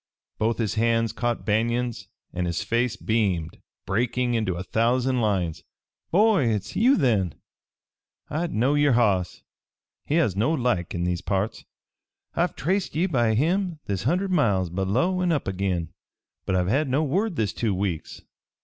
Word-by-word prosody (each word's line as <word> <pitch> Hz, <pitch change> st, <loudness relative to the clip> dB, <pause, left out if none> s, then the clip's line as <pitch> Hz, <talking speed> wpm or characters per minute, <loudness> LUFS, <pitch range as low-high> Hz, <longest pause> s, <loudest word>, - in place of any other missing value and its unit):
Both 115 Hz, +1 st, +1 dB
his 110 Hz, -4 st, -1 dB
hands 115 Hz, 0 st, +1 dB
caught 120 Hz, -1 st, -2 dB
Banion's 120 Hz, +2 st, 0 dB, 0.3 s
and 90 Hz, 0 st, -2 dB
his 85 Hz, 0 st, -2 dB
face 120 Hz, 0 st, 0 dB
beamed, 95 Hz, -8 st, -1 dB, 0.3 s
breaking 120 Hz, +4 st, 0 dB
into 110 Hz, -6 st, 0 dB
a 90 Hz, -, -4 dB
thousand 125 Hz, +5 st, +1 dB
lines. 95 Hz, -7 st, -1 dB, 0.5 s
"Boy, 200 Hz, -, +4 dB
hit's 105 Hz, -4 st, -2 dB
you, 255 Hz, +5 st, +4 dB
then! 100 Hz, -, +1 dB, 0.9 s
I 160 Hz, +4 st, -2 dB
knowed 135 Hz, +2 st, +1 dB
yer 145 Hz, -2 st, +4 dB
hoss 100 Hz, -7 st, +1 dB, 0.6 s
he 150 Hz, -, +1 dB
has 150 Hz, -, +2 dB
no 115 Hz, +11 st, +1 dB
like 120 Hz, -, -1 dB
in 85 Hz, -, -1 dB
these 90 Hz, -1 st, -1 dB
parts. 100 Hz, +3 st, -2 dB, 0.7 s
I've -, -, 0 dB
traced 185 Hz, +3 st, -1 dB
ye 165 Hz, +4 st, +2 dB
by 120 Hz, -, +1 dB
him 175 Hz, -, +1 dB
this 100 Hz, -3 st, -2 dB
hundred 180 Hz, -, 0 dB
miles 100 Hz, -, +2 dB
below 115 Hz, -, 0 dB
an' 180 Hz, -1 st, +1 dB
up 150 Hz, -9 st, -1 dB
agin, 90 Hz, -4 st, -2 dB, 0.5 s
but 95 Hz, -, +1 dB
I've 90 Hz, -1 st, +1 dB
had 135 Hz, +8 st, +1 dB
no 140 Hz, +5 st, +2 dB
word 185 Hz, +7 st, 0 dB
this 105 Hz, -7 st, -1 dB
two 110 Hz, -5 st, -1 dB
weeks. 90 Hz, -4 st, -3 dB
115 Hz, 160 wpm, -25 LUFS, 95-145 Hz, 0.9 s, Boy